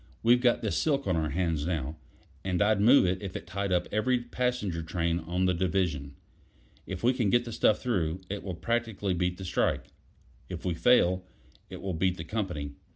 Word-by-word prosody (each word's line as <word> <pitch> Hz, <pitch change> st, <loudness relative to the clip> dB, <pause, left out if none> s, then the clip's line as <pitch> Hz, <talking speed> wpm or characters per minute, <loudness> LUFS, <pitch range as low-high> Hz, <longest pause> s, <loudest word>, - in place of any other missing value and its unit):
"We've 120 Hz, +2 st, +5 dB
got 120 Hz, -1 st, +3 dB
this 110 Hz, -, 0 dB
silk 140 Hz, -3 st, +1 dB
on 95 Hz, -, +1 dB
our 80 Hz, -1 st, 0 dB
hands 80 Hz, -2 st, -1 dB
now, 80 Hz, -4 st, -2 dB, 0.5 s
and 90 Hz, -2 st, -1 dB
I'd 105 Hz, +1 st, +3 dB
move 120 Hz, +1 st, +7 dB
it 95 Hz, +2 st, 0 dB
if 95 Hz, -2 st, -6 dB
it -, -, -5 dB
tied 100 Hz, +3 st, -3 dB
up 90 Hz, -1 st, +1 dB
every 125 Hz, +4 st, +2 dB
passenger 120 Hz, -7 st, -2 dB
train 85 Hz, +1 st, -1 dB
on 90 Hz, +3 st, -1 dB
the 90 Hz, -, +3 dB
division. 85 Hz, -6 st, -1 dB, 0.7 s
If 95 Hz, +1 st, -5 dB
we 125 Hz, +2 st, +4 dB
can 120 Hz, -6 st, +1 dB
get 120 Hz, +4 st, +3 dB
the 120 Hz, -, -6 dB
stuff 110 Hz, -1 st, +3 dB
through, 90 Hz, -8 st, 0 dB
it 100 Hz, +1 st, -4 dB
will 95 Hz, -3 st, -5 dB
practically 110 Hz, 0 st, -1 dB
beat 90 Hz, 0 st, -1 dB
the 95 Hz, -, -7 dB
strike. 90 Hz, -, 0 dB, 0.6 s
If -, -, -6 dB
we 90 Hz, -, +1 dB
fail, 90 Hz, -2 st, +3 dB, 0.5 s
it -, -, -9 dB
will 95 Hz, -1 st, -2 dB
beat 90 Hz, +2 st, 0 dB
the 80 Hz, -, -5 dB
company." 85 Hz, -7 st, -3 dB
95 Hz, 200 wpm, -29 LUFS, 85-110 Hz, 0.7 s, move